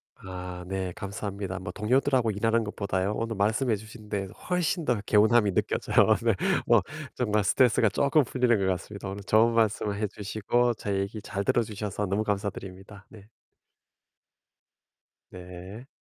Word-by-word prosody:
아 90 Hz, -1 st, -8 dB
네. 95 Hz, -1 st, -3 dB
감사합니다. 100 Hz, -1 st, -5 dB
뭐 95 Hz, -, -6 dB
동료들하고 125 Hz, +1 st, +1 dB
일하는 115 Hz, +3 st, +1 dB
것 105 Hz, -, -6 dB
보다요. 100 Hz, 0 st, -1 dB
오늘 115 Hz, -1 st, -3 dB
말씀해 110 Hz, +4 st, +1 dB
주신 110 Hz, +1 st, -12 dB
데 100 Hz, -2 st, -2 dB, 0.2 s
훨씬 180 Hz, -1 st, 0 dB
더 120 Hz, -4 st, +1 dB
개운함이 110 Hz, 0 st, +4 dB
느껴져요. -, -, +3 dB
네. -, -, +3 dB, 0.3 s
뭐 -, -, +5 dB, 0.3 s
정말 105 Hz, -4 st, 0 dB
스트레스가 115 Hz, 0 st, +3 dB
쪼끔 140 Hz, +7 st, +3 dB
풀리는 125 Hz, -2 st, +2 dB
것 95 Hz, -, 0 dB
같습니다. 95 Hz, +2 st, -3 dB
오늘 100 Hz, +1 st, -6 dB
좋은 110 Hz, +3 st, +4 dB
말씀을 105 Hz, -2 st, +1 dB
해 105 Hz, 0 st, -1 dB
주시고 110 Hz, +4 st, 0 dB
제 100 Hz, -1 st, -3 dB
얘기 100 Hz, +2 st, -4 dB
잘 100 Hz, -1 st, -4 dB
들어 120 Hz, -, +2 dB
주셔서 105 Hz, -1 st, -4 dB
너무 100 Hz, +3 st, 0 dB
감사드립니다. 100 Hz, -1 st, -5 dB
네. 105 Hz, -2 st, -15 dB, 2.0 s
네. 90 Hz, +7 st, -10 dB
105 Hz, 330 characters per minute, -27 LUFS, 100-115 Hz, 2.0 s, 뭐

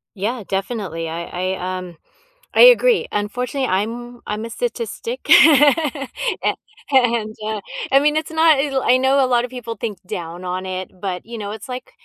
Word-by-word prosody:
Yeah. 220 Hz, +4 st, -3 dB
Definitely. 195 Hz, -5 st, -3 dB
I 170 Hz, +1 st, -5 dB, 0.3 s
I, 185 Hz, 0 st, -4 dB
um, 180 Hz, -2 st, -9 dB, 0.6 s
I -, -, +4 dB
agree. -, -, +6 dB
Unfortunately, 250 Hz, +6 st, -2 dB
I'm 235 Hz, +5 st, -3 dB
I'm 210 Hz, +1 st, -3 dB
a -, -, -7 dB
statistic. 470 Hz, -, -4 dB
A 295 Hz, -, +4 dB, 0.4 s
and, 235 Hz, -5 st, +2 dB
uh, 215 Hz, -1 st, -2 dB, 0.3 s
I 275 Hz, -, +6 dB
mean, 295 Hz, +1 st, +2 dB
it's 310 Hz, 0 st, -3 dB
not 320 Hz, -1 st, +4 dB
el 275 Hz, -1 st, 0 dB
I 250 Hz, -, +4 dB
know 265 Hz, +1 st, +3 dB
a -, -, +2 dB
lot 240 Hz, -1 st, +2 dB
of -, -, -9 dB
people 235 Hz, -3 st, -6 dB
think 225 Hz, -5 st, -5 dB
down 170 Hz, +1 st, -6 dB
on 185 Hz, +1 st, -3 dB
it, 185 Hz, 0 st, -5 dB
but, 185 Hz, -3 st, -4 dB
you 230 Hz, +1 st, -8 dB
know, 205 Hz, -2 st, -5 dB
it's 220 Hz, +6 st, -8 dB
like, 250 Hz, 0 st, -7 dB
240 Hz, 175 wpm, -20 LUFS, 195-275 Hz, 0.6 s, agree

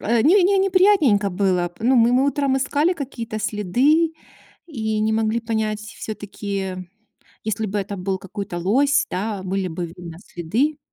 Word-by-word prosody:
не 265 Hz, -, +4 dB
не 390 Hz, +2 st, +3 dB
неприятненько 365 Hz, -, +4 dB
было. 180 Hz, -2 st, 0 dB
Ну, 250 Hz, +3 st, +3 dB
мы 235 Hz, +1 st, +5 dB
мы 265 Hz, +2 st, +3 dB
утром 280 Hz, -1 st, +1 dB
искали 290 Hz, +6 st, +1 dB
какие-то 245 Hz, -8 st, -5 dB
следы 260 Hz, -, +2 dB, 0.5 s
и 220 Hz, -8 st, -2 dB
не 220 Hz, +1 st, +1 dB
могли 220 Hz, +1 st, +1 dB
понять 220 Hz, -2 st, -2 dB
всё-таки. 200 Hz, -3 st, -5 dB, 0.7 s
Если 220 Hz, 0 st, -1 dB
бы 205 Hz, +1 st, -2 dB
это 200 Hz, 0 st, -4 dB
был 190 Hz, +1 st, -2 dB
какой-то 195 Hz, -2 st, -6 dB
лось, 280 Hz, +10 st, +2 dB
да, 200 Hz, 0 st, -3 dB
были 190 Hz, 0 st, -2 dB
бы 170 Hz, +1 st, -4 dB
видно 170 Hz, 0 st, -10 dB
следы 235 Hz, -, -1 dB
220 Hz, 150 wpm, -22 LUFS, 195-280 Hz, 0.7 s, мы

